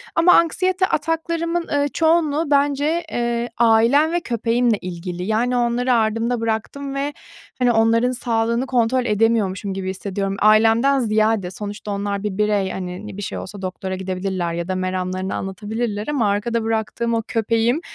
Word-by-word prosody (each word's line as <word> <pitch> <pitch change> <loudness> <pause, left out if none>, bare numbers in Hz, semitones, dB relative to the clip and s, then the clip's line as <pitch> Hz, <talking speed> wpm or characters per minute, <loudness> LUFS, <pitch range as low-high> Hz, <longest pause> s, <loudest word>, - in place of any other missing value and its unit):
Ama 345 +2 +6
anksiyete 370 +3 +3
ataklarımın, 335 +2 -1
ııı, 285 0 +2
çoğunluğu 320 -2 +1
bence, 290 +4 +2
eee, 235 0 -1
ailem 235 +7 +4
ve 345 - +1
köpeğimle 235 -3 +1
ilgili. 180 0 -6
Yani 230 +5 0
onları 245 +1 +1
ardımda 225 +1 +1
bıraktım 270 +5 -3
ve, 285 +1 -2 0.5
hani, 245 -1 +3
onların 230 +2 +3
sağlığını 235 0 0
kontrol 250 0 +1
edemiyormuşum 210 -3 +1
gibi 190 -1 -4
hissediyorum. 190 +1 -5 0.3
Ailemden 225 +6 +4
ziyade, 215 -4 +1
sonuçta 205 +1 -6
onlar 200 0 -2
bir 205 -2 -3
birey, 205 -2 +1
hani, 185 +2 -6
ne 200 -2 -8
bir - - -5
şey - - -4
olsa 200 +1 -8
doktora 185 0 -4
gidebilirler 185 -2 -3
ya 170 +1 -3
da 185 - -2
meramlarını 185 0 -2
anlatabilirler 210 +3 -4
ama 270 -8 +1
arkada 225 +3 -1
bıraktığım 225 +1 -1
o 225 - +1
köpeğim 230 +5 +1
225 Hz, 150 wpm, -21 LUFS, 200-255 Hz, 0.5 s, Ama